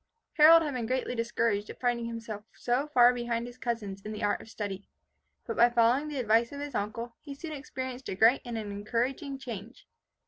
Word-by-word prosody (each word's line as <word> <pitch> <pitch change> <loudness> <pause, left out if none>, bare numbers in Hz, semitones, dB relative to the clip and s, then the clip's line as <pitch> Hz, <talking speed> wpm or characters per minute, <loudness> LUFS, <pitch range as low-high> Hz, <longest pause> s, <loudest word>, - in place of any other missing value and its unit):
Harold 325 +1 +8
had 295 -3 -2
been 240 -3 -3
greatly 255 0 -1
discouraged 230 -3 0
at - - -9
finding 240 -2 0
himself 230 -3 -6
so 250 +4 0
far 250 -4 +6
behind 235 -1 -2
his 245 +1 -11
cousins 210 -6 -3
in 215 - -7
the 215 0 -5
art 205 - +1
of - - -13
study, 205 -3 -5 0.6
but 230 - -4
by 240 +1 +6
following 240 +5 +3
the 300 -2 -5
advice 230 -1 +2
of 285 - -7
his 290 -1 -5
uncle, 230 +3 -3
he 285 -2 -8
soon 315 +3 -7
experienced 260 -3 -6
a - - -3
great 225 +7 +5
and 240 -2 -5
an 210 -2 -4
encouraging 245 +7 -2
change. 235 -3 -8
235 Hz, 205 wpm, -29 LUFS, 225-260 Hz, 0.6 s, Harold